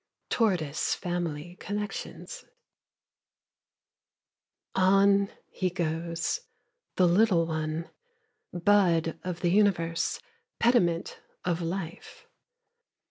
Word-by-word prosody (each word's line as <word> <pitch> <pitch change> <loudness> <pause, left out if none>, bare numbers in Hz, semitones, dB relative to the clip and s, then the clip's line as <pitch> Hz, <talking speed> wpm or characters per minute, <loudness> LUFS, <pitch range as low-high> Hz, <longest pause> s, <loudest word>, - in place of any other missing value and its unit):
TORTOISE 175 -10 +1
FAMILY 175 -1 -4
CONNECTIONS 210 - -5 2.3
On 195 +1 +4 0.2
he 185 - -1
goes, 170 -1 -2 0.6
the 185 - +4
little 180 -2 +4
one, 160 0 -3 0.6
Bud 175 -3 +2
of 180 -2 -4
the 175 - +2
universe, 175 -5 +2 0.4
Pediment 180 -8 +2 0.3
of 175 -1 0
life. 170 0 -5
175 Hz, 75 wpm, -28 LUFS, 165-195 Hz, 2.3 s, On